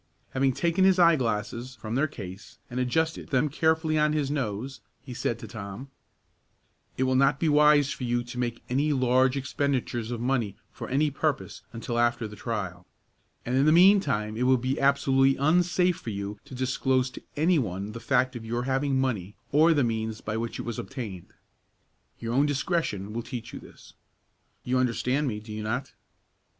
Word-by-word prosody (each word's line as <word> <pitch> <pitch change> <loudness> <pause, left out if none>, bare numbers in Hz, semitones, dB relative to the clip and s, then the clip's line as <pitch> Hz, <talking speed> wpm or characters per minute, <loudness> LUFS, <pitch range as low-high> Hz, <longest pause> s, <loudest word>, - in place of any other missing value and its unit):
Having 135 0 +1
taken 170 +6 +1
his 190 -1 +5
eye 170 -2 +6
glasses 120 0 -3
from 110 -2 -6
their 140 +5 +2
case 100 -8 -10
and 125 - -3
adjusted 160 +6 -1
them 135 +3 +2
carefully 160 +1 +1
on 150 0 +3
his 145 -2 0
nose, 130 -1 -3 0.2
he 130 - -8
said 120 -2 -2
to - - -9
Tom, 110 +4 -8 1.1
"It 130 - +1
will 130 0 +1
not 135 +1 +3
be 165 - +1
wise 150 -1 +5
for - - -5
you 120 0 0
to 120 +1 -7
make 120 -1 -3
any 145 +4 +1
large 130 0 +3
expenditures 130 -4 -2
of 120 -2 -3
money 120 -5 -1
for - - -8
any 145 +3 +2
purpose 150 +1 -2
until 120 0 -3
after 120 -1 +1
the 105 - -10
trial; 95 -7 -4 0.6
and 125 - -1
in 135 +3 +3
the - - +6
mean 190 +5 +7
time 110 - -2
it 125 +3 0
will 130 0 +5
be 130 +3 -2
absolutely 135 -1 +3
unsafe 175 +4 +2
for 150 - -7
you 100 0 -5
to 130 - -10
disclose 130 0 0
to - - -10 0.2
any 165 +2 +3
one 100 -3 -3
the 115 - -7
fact 130 +2 +1
of 120 - -6
your 120 +2 -2
having 135 +1 0
money 105 -7 -2 0.2
or 155 +4 +5
the 145 -4 +3
means 110 -1 -2
by 105 - -4
which 115 +1 -3
it - - -5
was 120 -2 -4
obtained. 110 -10 -7 0.9
Your 115 0 -3
own 140 +4 +3
discretion 140 - -1
will 120 - -2
teach 115 0 -7
you - - -6
this. - - -16 0.7
You 125 +1 +1
understand 130 +3 0
me, 105 -4 -2
do 105 0 -10
you 110 - -4
not?" 120 +5 -3
130 Hz, 190 wpm, -27 LUFS, 115-145 Hz, 1.1 s, mean